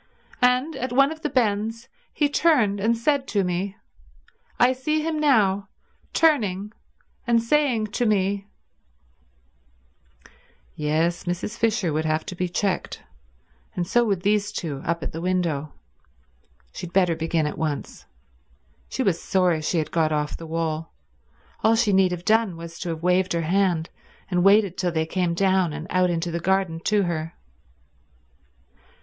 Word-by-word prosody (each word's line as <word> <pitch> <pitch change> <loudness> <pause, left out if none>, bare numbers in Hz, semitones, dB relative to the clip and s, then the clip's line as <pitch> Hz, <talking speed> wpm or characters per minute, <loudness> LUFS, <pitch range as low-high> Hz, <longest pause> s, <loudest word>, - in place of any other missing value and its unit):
And 250 +5 +2
at 255 +1 -3
one 275 +3 +4
of 315 0 -8
the 300 - -1
bends 225 -2 0 0.2
he 295 - +1
turned 275 -10 +2
and 225 +3 +1
said 275 +3 +1
to 200 -2 +1
me—I 195 +6 -3
see 305 +4 -1
him 315 -1 -1
now 205 -9 +2 0.4
turning 210 - +1 0.5
and 235 -1 +4
saying 240 -2 +1
to 240 - +1
me—" 200 -1 0 2.3
Yes, 160 +4 0
Mrs. 175 +5 -3
Fisher 215 -8 0
would 155 +1 -1
have 155 0 0
to 185 - -6
be 180 0 -2
checked. 190 +2 -2 0.7
And 175 - -1
so 240 +7 +3
would 195 -5 -1
these 205 0 +1
two 150 -9 -4
up 170 -2 -2
at - - -4
the 165 - -6
window. 170 -5 -1 1.0
She 180 - -6
had 170 - -15
better 180 -3 +3
begin 165 -1 0
at 150 - -4
once. 155 -3 -4 0.8
She 265 - -2
was 180 -7 +1
sorry 180 -4 +1
she 160 +3 -1
had 155 - -1
got 160 -2 +1
off 150 -1 -1
the 165 - -8
wall. 160 0 -3 0.7
All 220 +1 +5
she 225 -3 +2
need 190 -1 +4
have 175 0 -5
done 220 -5 +2
was 170 0 -9
to 175 - -4
have 165 0 -5
waved 180 +1 +2
her 170 - 0
hand, 175 -1 +1 0.4
and 180 -1 +2
waited 200 -1 +4
till 180 -2 0
they 160 -1 0
came 175 0 -1
down 190 -3 +2
and 155 +2 -6
out 185 0 +3
into 170 0 -2
the 170 - -2
garden 190 -2 0
to 210 -1 +2
her. 165 -2 -3
190 Hz, 155 wpm, -24 LUFS, 165-225 Hz, 2.3 s, All